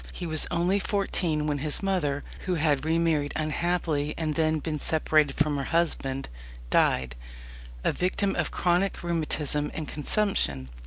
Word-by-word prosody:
He 180 - -6
was 155 -2 +3
only 175 +3 +1
fourteen 180 -7 0
when 145 -1 -1
his 150 +5 -2
mother 155 -8 0 0.2
(who 180 - +1
had 150 -3 +1
re 160 +1 +2
married 155 -4 +1
unhappily 155 -1 -1
and 155 -2 -1
then 160 0 +2
been 155 0 -3
separated 155 -2 +2
from 150 -1 +2
her 135 - -2
husband) 135 -5 0 0.4
died, 65 -1 +2 0.7
a - - +2
victim 195 +2 0
of - - 0
chronic 180 +2 0
rheumatism 150 -3 -1
and 155 -2 -4
consumption. 145 - 0
155 Hz, 150 wpm, -27 LUFS, 145-175 Hz, 0.7 s, was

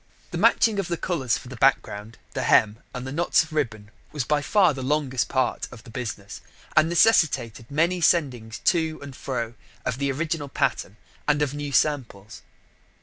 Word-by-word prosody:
The - - -3
matching 215 -3 +4
of 195 - -2
the 170 - -2
colours 140 -10 0
for - - -11
the 130 - -8
background, 115 -4 +1 0.2
the - - -2
hem, 110 +1 +3
and 125 -1 -6
the 130 - -5
knots 170 +4 +2
of 160 -1 -12
ribbon 110 -8 -2 0.2
was 150 -4 -2
by 150 +3 +1
far 185 0 +3
the 135 - -6
longest 135 -2 0
part 130 -2 0
of 120 -2 -12
the 115 - -13
business, 110 -5 -6 0.3
and 155 +1 +5
necessitated 150 - +2
many 170 +5 +1
sendings 130 -9 +1
to 160 -3 +1
and 140 -2 -9
fro 120 -4 -4 0.3
of 125 0 -2
the 140 -1 0
original 155 0 -2
pattern 105 -5 -1 0.3
and 150 0 +3
of 140 -2 -2
new 145 -1 -4
samples. 125 -8 -1
140 Hz, 180 wpm, -25 LUFS, 120-155 Hz, 0.3 s, and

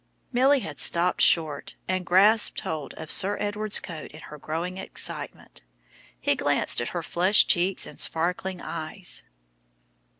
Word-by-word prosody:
Milly 265 +3 +3
had 150 -7 -6
stopped 175 +2 +1
short, 155 -4 +2
and 185 -2 -2
grasped 210 +5 +4
hold 155 -2 -6
of 160 -1 -8
Sir 200 +2 +4
Edward's 210 0 +1
coat 165 -3 -9
in 155 - -11
her 150 - -11
growing 170 +5 -5
excitement. - - -7 0.6
He - - +1
glanced - - +1
at 120 - -3
her 175 -2 -5
flushed 185 +6 +3
cheeks 180 +2 +1
and - - -12
sparkling 180 +3 -1
eyes. 170 +4 -3
180 Hz, 140 wpm, -25 LUFS, 160-200 Hz, 0.6 s, grasped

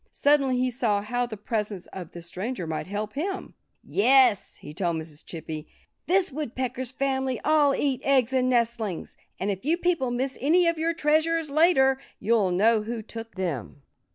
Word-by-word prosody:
Suddenly 280 -3 +3
he 255 0 +1
saw 220 -5 0
how 245 +3 -1
the 220 -3 -7
presence 210 -3 -3
of 180 -4 -7
this 170 -1 -9
stranger 185 +3 -4
might 160 +1 -4
help 210 +2 -4
him. 380 +6 -4 0.3
"Yes!" 260 - +3
he 150 - -11
told 170 0 -1
Mrs. 160 -2 -7
Chippy. 160 -2 -7 0.4
"This 375 -1 +2
Woodpecker 260 -2 -3
family 265 -1 -1
all 295 -2 +4
eat 265 -3 0
eggs 265 -2 +3
and 255 -1 +2
nestlings. 235 -6 -1 0.2
And 200 +2 0
if 190 -1 -5
you 320 +5 +2
people 345 -7 +1
miss 255 +2 -2
any 340 +6 +4
of 335 -1 +1
your 330 +1 0
treasures, 315 0 +1
later, 280 -4 +4 0.2
you'll 215 -3 +2
know 215 +5 +3
who 225 +1 -5
took 225 +1 -9
them." 150 - -4
245 Hz, 170 wpm, -26 LUFS, 205-280 Hz, 0.4 s, all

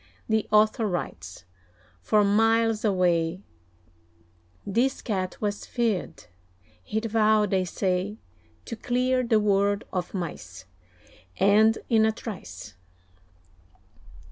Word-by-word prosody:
(The 220 -1 0
author 215 +1 +3
writes) 95 - -5 0.6
For 210 - +3
miles 225 +2 +2
away, 180 -3 +1 1.2
This 235 +7 0
Cat 185 -5 -3
was 205 -1 -3
feared; 230 -7 -2 0.6
he'd 220 - -3
vowed, 215 -2 +2
they 190 -1 +1
say, 185 +3 -2 0.5
To - - -6
clear 250 +3 0
the 230 -3 +2
world 200 -1 +1
of 180 +1 -3
mice, 95 - -6 0.7
And 215 +3 +4
in 220 -1 +4
a - - +2
trice. 105 - -9
210 Hz, 100 wpm, -26 LUFS, 185-220 Hz, 1.2 s, And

